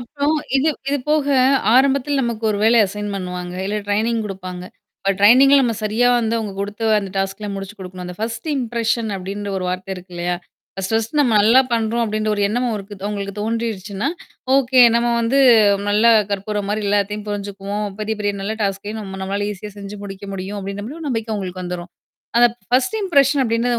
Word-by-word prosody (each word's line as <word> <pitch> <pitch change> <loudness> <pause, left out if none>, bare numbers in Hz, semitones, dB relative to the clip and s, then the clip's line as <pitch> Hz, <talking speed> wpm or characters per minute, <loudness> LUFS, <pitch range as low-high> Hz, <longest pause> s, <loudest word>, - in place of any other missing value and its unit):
அப்புறம் 285 +5 -1 0.2
இது 290 +4 +2 0.2
இது 285 0 +1
போக 300 -1 +3 0.5
ஆரம்பத்தில 275 +1 +3
நமக்கு 235 -2 -3
ஒரு 205 - -1
வேள 230 +2 +5
அசைன் 205 +1 -5
பண்ணுவாங்க. 180 -1 -5
இல்ல 210 +1 -2
ட்ரெய்னிங் 225 +3 +1
குடுப்பாங்க. 185 -2 -7 0.3
இப்ப 195 0 +1
ட்ரெய்னிங்ல 265 +7 +7
நம்ம 230 -2 +1
சரியா 220 +4 +2
வந்து 225 0 0
உங்க 205 -2 -5
குடுத்து 205 +3 -4
அந்த 195 -2 -5
டாஸ்க்லாம் 195 +1 -2
முடிச்சு 195 +1 -7
குடுக்கணும். 180 -1 -8
அந்த 180 0 -8
1 225 +6 -4
இம்ப்ரஷன் 230 -2 -1
அப்டின்ற 200 +2 -5
ஒரு 185 - -4
வார்த்த 185 +1 -3
இருக்கு 180 0 -13
இல்லயா? 175 +1 -1 0.4
1 195 +2 -4
1 225 +7 0
நம்ம 240 -6 +3
நல்லா 230 +5 +6
பண்ணுறோம் 230 0 +1
அப்டின்ற 215 0 -1
ஒரு 205 - -1
எண்ணம் 245 +3 0
அவருக்கு 205 -1 -5
அவங்களுக்கு 200 -1 -4
தோன்றிடுச்சுன்னா, 215 -3 -2 0.5
ஓகே 260 -1 +4 0.2
நம்ம 235 +1 +1
வந்து 240 +4 +1 0.5
நல்லா 220 +3 +5 0.2
கற்பூரம் 200 0 -2
மாரி 210 0 -1
எல்லாத்தயும் 205 +1 0
புரிஞ்சுக்குவோம். 200 0 -4
பெரிய, 220 0 -2
பெரிய 205 0 0
நல்ல 215 +3 -2
டாஸ்கையும் 205 +2 -3
நம்ம 190 -2 -7
நம்மளால 200 +2 -2
ஈஸியா 210 +1 -9
செஞ்சு 200 +1 -8
முடிக்க 195 0 -8
முடியும் 195 +2 -5
அப்டின்ற 200 +1 -5
மாரி 295 +7 -8
ஒரு 310 - -4
நம்பிக்கை 225 -3 -2
உங்களுக்கு 185 -2 -5
வந்துரும். 175 0 -6 0.5
அத 240 - +7
அப் 235 - -17
1 255 - +2
இம்ப்ரஷன் 280 -6 +3
அப்டின்றது 235 +1 +1
210 Hz, 180 wpm, -20 LUFS, 195-235 Hz, 0.5 s, ட்ரெய்னிங்ல